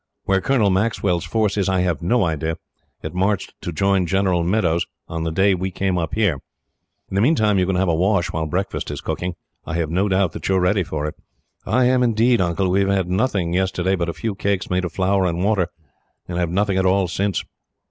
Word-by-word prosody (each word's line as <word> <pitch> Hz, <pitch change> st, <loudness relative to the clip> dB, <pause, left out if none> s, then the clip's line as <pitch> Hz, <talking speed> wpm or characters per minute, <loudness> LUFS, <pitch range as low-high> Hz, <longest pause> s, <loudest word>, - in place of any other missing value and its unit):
Where 95 Hz, -1 st, +1 dB
Colonel 115 Hz, -6 st, +2 dB
Maxwell's 95 Hz, -3 st, 0 dB
force 105 Hz, +3 st, 0 dB
is, 95 Hz, -2 st, +1 dB
I 95 Hz, -1 st, +2 dB
have 90 Hz, -3 st, -1 dB
no 100 Hz, +5 st, +2 dB
idea. 80 Hz, 0 st, -2 dB, 0.5 s
It 80 Hz, -, -5 dB
marched 95 Hz, +2 st, 0 dB
to 85 Hz, -, -4 dB
join 95 Hz, +2 st, +1 dB
General 95 Hz, -2 st, +1 dB
Meadows, 85 Hz, -2 st, +1 dB, 0.2 s
on 80 Hz, 0 st, -4 dB
the 80 Hz, -, -1 dB
day 95 Hz, +4 st, +3 dB
we 95 Hz, +1 st, -2 dB
came 95 Hz, 0 st, -1 dB
up 80 Hz, +1 st, -3 dB
here. 100 Hz, -10 st, +1 dB, 0.7 s
"In -, -, -9 dB
the 100 Hz, -, +2 dB
meantime 110 Hz, -7 st, +3 dB
you 90 Hz, -, +1 dB
can 95 Hz, -, 0 dB
have 95 Hz, +1 st, +1 dB
a 85 Hz, -, +2 dB
wash, 90 Hz, +2 st, +1 dB
while 80 Hz, 0 st, -1 dB
breakfast 95 Hz, +6 st, -3 dB
is 75 Hz, -1 st, -4 dB
being -, -, -3 dB
cooked. 90 Hz, -1 st, -4 dB, 0.3 s
I 80 Hz, -, -4 dB
have 80 Hz, -2 st, -1 dB
no 95 Hz, +4 st, +1 dB
doubt 95 Hz, -2 st, +2 dB
that -, -, -5 dB
you 95 Hz, -, +3 dB
are -, -, +3 dB
ready 90 Hz, +3 st, +2 dB
for 80 Hz, -4 st, -3 dB
it." 75 Hz, -, -3 dB, 0.5 s
"I 130 Hz, -1 st, +3 dB
am 125 Hz, 0 st, +3 dB
indeed, 120 Hz, -1 st, +3 dB
Uncle. 90 Hz, +1 st, 0 dB
We 95 Hz, +2 st, +3 dB
had 95 Hz, -2 st, 0 dB
nothing, 95 Hz, -4 st, 0 dB
yesterday, 95 Hz, 0 st, 0 dB
but 85 Hz, -2 st, -2 dB
a -, -, -3 dB
few 110 Hz, +3 st, -3 dB
cakes 100 Hz, -1 st, -2 dB
made 90 Hz, 0 st, +1 dB
of 85 Hz, -, -4 dB
flour 95 Hz, +1 st, +1 dB
and 85 Hz, +1 st, -1 dB
water; 100 Hz, -4 st, +2 dB, 0.6 s
and 85 Hz, 0 st, -3 dB
have 85 Hz, -2 st, 0 dB
had 85 Hz, -, -4 dB
nothing 100 Hz, -1 st, +1 dB
at 95 Hz, -, +1 dB
all, 95 Hz, 0 st, +2 dB
since." 95 Hz, +1 st, -1 dB
95 Hz, 230 wpm, -21 LUFS, 85-100 Hz, 0.7 s, day